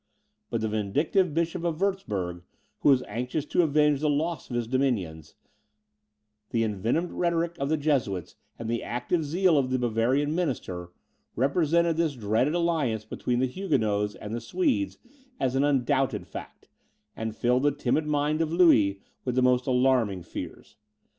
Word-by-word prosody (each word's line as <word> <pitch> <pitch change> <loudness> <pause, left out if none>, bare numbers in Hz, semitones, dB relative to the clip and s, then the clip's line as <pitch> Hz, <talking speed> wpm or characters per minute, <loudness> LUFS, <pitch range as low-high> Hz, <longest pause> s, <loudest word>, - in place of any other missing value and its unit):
But 115 - -2
the 110 - 0
vindictive 140 - +1
Bishop 165 +2 -1
of 170 -2 -1
Wurtzburg, 105 - -2 0.4
who - - +3
was 130 -2 +5
anxious 125 +7 -3
to 180 - +2
avenge 150 -2 +3
the 150 +1 +1
loss 160 +3 -1
of 120 - -4
his 120 -1 0
dominions, 110 - -1 1.1
the 115 -1 +1
envenomed 115 - -1
rhetoric 170 -1 0
of 140 - -1
the 155 - +2
Jesuits 125 - -1 0.2
and 115 - -6
the 115 0 -1
active 125 +8 -1
zeal 165 +1 +3
of 130 -2 0
the 130 - +1
Bavarian 125 +5 +1
minister, 120 - -3 0.5
represented 165 +4 +2
this 165 -4 +1
dreaded 115 +7 +1
alliance 155 -11 0
between 120 +2 -2
the - - +3
Huguenots 110 - 0
and 105 +1 -7
the 120 - -3
Swedes 300 -5 0 0.4
as 130 -1 0
an 135 - +3
undoubted 135 -1 +1
fact, - - -10 0.5
and 110 -1 -4
filled 125 +2 +2
the 145 +1 +3
timid 145 +2 0
mind 150 +1 +1
of 160 -1 0
Louis 110 - +4 0.2
with 125 -1 -2
the 130 - +3
most 125 0 +3
alarming 125 -7 +2
fears. 95 - -8
135 Hz, 160 wpm, -27 LUFS, 115-160 Hz, 1.1 s, was